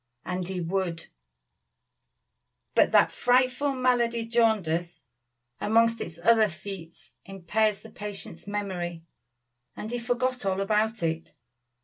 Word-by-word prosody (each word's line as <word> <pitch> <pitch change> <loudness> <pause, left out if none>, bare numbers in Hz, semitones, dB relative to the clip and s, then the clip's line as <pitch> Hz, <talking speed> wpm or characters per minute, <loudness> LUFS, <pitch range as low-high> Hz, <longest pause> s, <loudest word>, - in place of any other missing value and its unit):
And 180 -1 -3
he 190 -1 -3
would; 175 -1 -2 1.6
but - - +4
that - - +5
frightful 255 +3 +2
malady, 240 -2 +1
jaundice, 200 -8 +1 0.5
among 230 +2 +4
its 165 -1 -5
other 220 +2 +5
feats, 170 -1 -9
impairs 200 +2 0
the - - -12
patient's 200 -4 -7
memory; 180 -5 -3 0.7
and 215 - -5
he 245 - -2
forgot 250 +1 -1
all 195 -1 0
about 215 +1 +1
it. 165 0 -2
205 Hz, 110 wpm, -27 LUFS, 175-230 Hz, 1.6 s, that